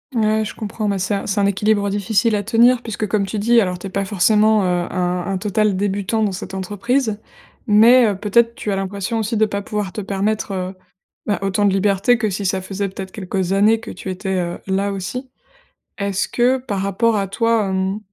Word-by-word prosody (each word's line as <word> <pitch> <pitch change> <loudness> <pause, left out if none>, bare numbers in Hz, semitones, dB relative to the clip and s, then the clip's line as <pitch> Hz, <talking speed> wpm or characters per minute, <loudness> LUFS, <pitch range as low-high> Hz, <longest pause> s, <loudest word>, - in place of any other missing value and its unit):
Ouais, 220 -1 +2
je 215 - -6
comprends. 215 -1 -3
Bah, 200 - 0
c'est 190 +2 -1
un 200 - -2
c'est 200 - 0
un 200 - +3
équilibre 205 +1 +1
difficile 205 +3 +1
à 205 - 0
tenir, 235 +4 +4
puisque 225 -2 -4
comme 200 -1 0
tu 215 - -4
dis, 230 +3 +4
alors, 180 -3 -1
tu 175 - -10
es - - -4
pas 195 +1 -1
forcément, 210 +2 +3
heu, 180 -1 0
un 180 -1 -2
un 195 -1 -1
total 210 +1 +1
débutant 205 +2 -1
dans 205 - +1
cette 190 +1 -7
entreprise. 210 +4 -1 0.5
Mais, 230 +3 +6
heu, 205 - 0
peut-être, 230 +4 +2
tu 210 - -4
as - - 0
l'impression 195 +3 -3
aussi 220 +1 -1
de 220 - +4
pas 200 -1 -3
pouvoir 205 -2 -4
te 215 - -4
permettre, 205 +2 -2
heu, 185 0 -4 0.5
bah, 205 - +1
autant 195 +1 +1
de 200 - +3
liberté 200 +4 +2
que 220 -3 -1
si 195 +2 -3
ça 190 +1 0
faisait 195 +1 -3
peut-être 190 0 -8
quelques 190 -2 -2
années 210 +3 +4
que - - -8
tu 190 - -7
étais, 190 +1 -3
heu, 175 -1 -3
là, 195 +1 0
aussi. 200 +7 -5 0.7
Est-ce 200 -1 -1
que 250 +2 +2
par 205 -7 -3
rapport 215 +4 +1
à 195 -1 -1
toi, 230 0 +1
hem, 190 +2 -1
200 Hz, 220 wpm, -19 LUFS, 190-220 Hz, 0.7 s, Mais